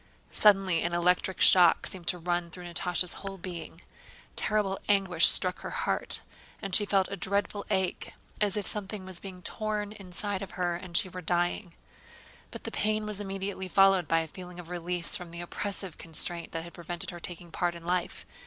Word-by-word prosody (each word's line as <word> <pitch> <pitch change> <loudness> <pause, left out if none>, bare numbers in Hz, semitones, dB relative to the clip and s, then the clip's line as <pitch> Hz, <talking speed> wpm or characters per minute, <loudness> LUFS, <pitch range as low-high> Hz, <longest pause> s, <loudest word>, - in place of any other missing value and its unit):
Suddenly 195 -5 +4
an 170 - 0
electric 180 +2 +2
shock 180 -2 +7
seemed 180 -3 -5
to 180 - +2
run 175 0 -1
through 180 +2 -8
Natásha's 180 0 +1
whole 195 -1 -6
being. 170 -2 -7 0.5
Terrible 210 -2 +1
anguish 190 -5 +5
struck 185 -1 +4
her - - -6
heart, - - -2 0.5
she 205 +2 +3
felt 195 -2 +3
a - - -1
dreadful 200 +2 -1
ache 190 -3 0 0.3
as 205 0 +3
if 205 - -1
something 205 -1 -3
was 185 -2 -3
being 185 -2 -9
torn 210 0 -2
inside 200 0 -3
her 175 -1 -1
and 175 0 -3
she - - +3
were 185 0 -7
dying. 175 +2 0 0.8
But - - -8
the - - -5
pain 215 0 0
was 210 -1 -4
immediately 195 -1 -4
followed 195 0 +5
by 165 0 +3
a 160 - -4
feeling 180 +2 -9
of 170 -1 -9
release 175 0 0
from 180 -4 -5
the 170 +1 -6
oppressive 190 0 -4
constraint 165 +1 -1
that 165 -1 -3
had 170 - -10
prevented 175 +1 -5
her 175 - -8
taking 175 0 -7
part 175 0 0
in 170 0 -10
life. 180 0 -1
180 Hz, 180 wpm, -29 LUFS, 175-195 Hz, 0.8 s, shock